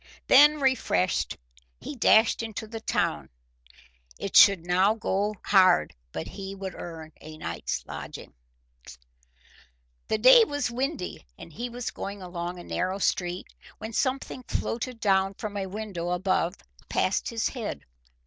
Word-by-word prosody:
Then, 295 +3 +7
refreshed, 260 - +1 0.4
he 295 - -7
dashed 220 -2 +4
into 220 -1 -5
the 225 +1 -7
town. - - -1 0.9
It - - -5
should 190 -4 +7
now 185 +4 +3
go 210 -1 -1
hard 185 -3 +4 0.2
but 80 - -5
he 195 -1 -7
would 190 -2 -6
earn 160 -2 -8
a 155 0 -10
night's - - -4
lodging. - - -8 1.7
The 220 - +1
day 255 - +8
was 290 - -2
windy 265 - -3
and 165 - -12
he 240 +6 -5
was 245 0 -5
going 200 +1 -6
along 175 -1 -5
a 175 - -9
narrow 185 +2 -2
street, 180 -2 -1 0.3
when 220 +1 -7
something 260 +1 -1
floated 240 +1 -3
down 195 -2 +2
from 210 0 -6
a 195 -1 -3
window 190 -4 -5
above 180 0 0 0.3
past - - 0
his 230 -2 -1
head. 230 - -6
200 Hz, 140 wpm, -27 LUFS, 180-235 Hz, 1.7 s, day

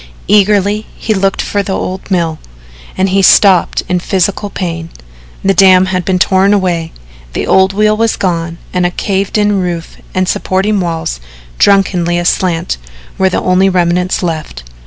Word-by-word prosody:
Eagerly 205 +1 +2
he 220 - -1
looked 195 -1 0
for 205 - -1
the 200 -1 -4
old 185 +2 -5
mill, 170 -4 -1 0.6
and 190 +1 +1
he 195 +1 +2
stopped 190 -2 +4
in 180 -1 0
physical 195 +3 -1
pain. 165 -4 -5 0.5
The 195 - +2
dam 185 0 +5
had 185 -2 -2
been 185 0 +1
torn 190 +2 +3
away, 175 -4 -1 0.4
the - - -2
old 190 0 +3
wheel 215 +1 +2
was 225 0 0
gone 170 -2 -2 0.2
and 180 -1 0
a 175 - +2
caved 195 +3 -2
in 205 -1 +1
roof 175 -3 -4 0.2
and 185 0 +1
supporting 195 +4 0
walls, 165 - -3 0.4
drunkenly 180 -3 +2
aslant, 175 - 0 0.4
were 190 0 +3
the - - -2
only 185 +1 +3
remnants 180 0 0
left. 155 - -4
185 Hz, 155 wpm, -12 LUFS, 175-195 Hz, 0.6 s, dam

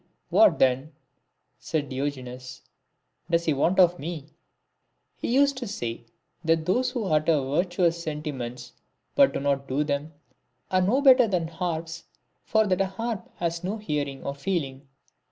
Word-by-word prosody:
'•' - - -38 0.3
What, 325 -1 +6
then," 135 +4 +2 0.7
said 145 -4 -2
Diogenes, 130 -2 -5 0.3
" - - -46
does 170 0 +2
he 155 - +2
want 165 +7 +1
of 175 -1 +5
me? 155 -1 -6 0.4
" - - -50
He - - -1
used 280 +1 +3
to 245 -2 -4
say, 120 - -5 0.4
that 165 -1 +2
those 250 +8 +2
who 245 -2 -3
utter 155 -2 +3
virtuous 170 +4 0
senti 150 -1 -4
ments 120 -2 -7 0.4
but 280 -1 +5
do - - -3
not 140 0 0
do 140 +3 0
them, 145 +1 -2 0.6
are 185 0 +3
no 225 +10 +2
better 260 -3 +7
than 175 -5 -1
harps, 165 -1 -4 0.4
for 220 0 +2
that 190 -1 +1
a 195 - +2
harp 225 +2 -4
has 170 0 -2
no 200 +4 -2
hearing 145 -9 -3
or 140 - -3
feeling. 140 -3 -3
165 Hz, 165 wpm, -26 LUFS, 140-190 Hz, 0.7 s, better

